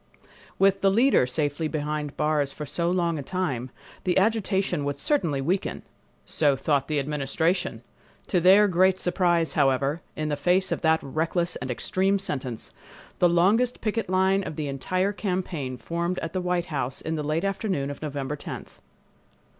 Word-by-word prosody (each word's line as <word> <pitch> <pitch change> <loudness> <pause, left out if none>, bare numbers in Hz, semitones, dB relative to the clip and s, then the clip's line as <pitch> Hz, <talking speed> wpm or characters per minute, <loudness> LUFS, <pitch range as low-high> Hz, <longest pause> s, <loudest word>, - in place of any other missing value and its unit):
With 195 0 +3
the 195 - +4
"leader" 230 - +4
safely 145 +3 -1
behind 150 -1 -2
the - - -15
bars 150 -2 0
for 150 - -7
so 170 +4 -1
long 170 -3 0
a - - -3
time, 140 -6 -2 0.3
the 180 -2 +1
agitation 195 -5 +1
would 145 0 -2
certainly 160 - +1
weaken! 185 +8 -1 0.4
So 145 -3 +2
thought 140 0 0
the 155 - -1
Administration! 150 +5 -1 0.4
To 180 - +1
their 195 +4 +7
great 185 0 +3
surprise, 175 -2 +1
however, 140 +2 +1
in 155 0 -2
the 145 - 0
face 180 +6 +1
of - - -1
that 160 -1 +3
reckless 165 +4 -1
and - - -6
extreme 190 +10 +1
sentence, 130 - -4 0.5
the 175 - +5
longest 205 +9 +3
picket 220 -2 -2
line 190 +1 +2
of 155 - -6
the 150 -1 -3
entire 185 +8 -1
campaign 180 -10 -3
formed 170 +5 -2
at 165 - -4
the 185 - -1
White 180 -2 -1
House 135 -2 -2
in 160 - -3
the 155 - -2
late 155 +3 -1
afternoon 195 -8 -1
of 145 - -9
November 145 -1 -3
10th. 145 - -8
170 Hz, 170 wpm, -26 LUFS, 145-185 Hz, 0.5 s, their